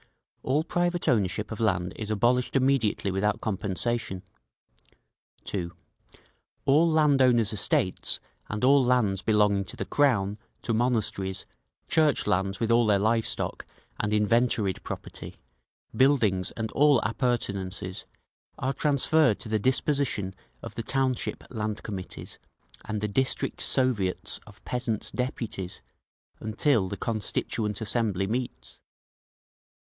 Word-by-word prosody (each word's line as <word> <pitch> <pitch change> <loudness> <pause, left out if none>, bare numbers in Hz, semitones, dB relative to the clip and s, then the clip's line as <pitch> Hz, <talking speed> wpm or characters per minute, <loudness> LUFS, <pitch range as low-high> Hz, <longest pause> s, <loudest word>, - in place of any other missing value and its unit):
All 145 +4 +1
private 175 +1 -1
ownership 105 -1 +1
of 110 - -5
land 95 -5 +1
is 110 -1 -5
abolished 120 +5 +1
immediately 130 -7 +2
without 100 +2 0
compensation. 100 0 -2 1.2
(2.) 85 -4 -3 0.9
All 155 +5 +5
land 150 -4 +4
owners' 120 -4 +4
estates, 95 -2 0 0.3
and 105 +2 -3
all 135 +1 +6
lands 115 -6 +2
belonging 105 -2 +3
to - - -8
the - - -3
Crown, 110 -8 +2 0.2
to 115 - -1
monasteries, 110 -5 0 0.4
church 155 -2 +2
lands 95 +1 0
with 115 0 0
all 115 -1 +4
their 105 -1 +4
live 110 +3 +2
stock - - -3 0.3
and 105 - -1
inventoried 105 -2 +2
property, - - -7 0.6
buildings 110 -8 +3
and 110 -1 -4
all 145 -2 +5
appurtenances, 100 -5 -2 0.5
are 135 +1 -1
transferred 145 -2 +3
to - - -7
the 110 0 +1
disposition 130 -5 0 0.3
of - - -7
the - - -4
township 130 0 -1
Land 110 -3 -3
Committees 95 -4 -7 0.5
and 110 -1 -3
the 105 - 0
district 130 +6 -1
Soviets 115 -9 +1
of - - -16
Peasants' 120 -4 -2
Deputies 115 -7 -4 0.6
until 110 -2 +1
the 100 - -4
Constituent 105 0 -2
Assembly 110 -3 0
meets. 95 - -4
110 Hz, 120 wpm, -27 LUFS, 100-130 Hz, 1.2 s, all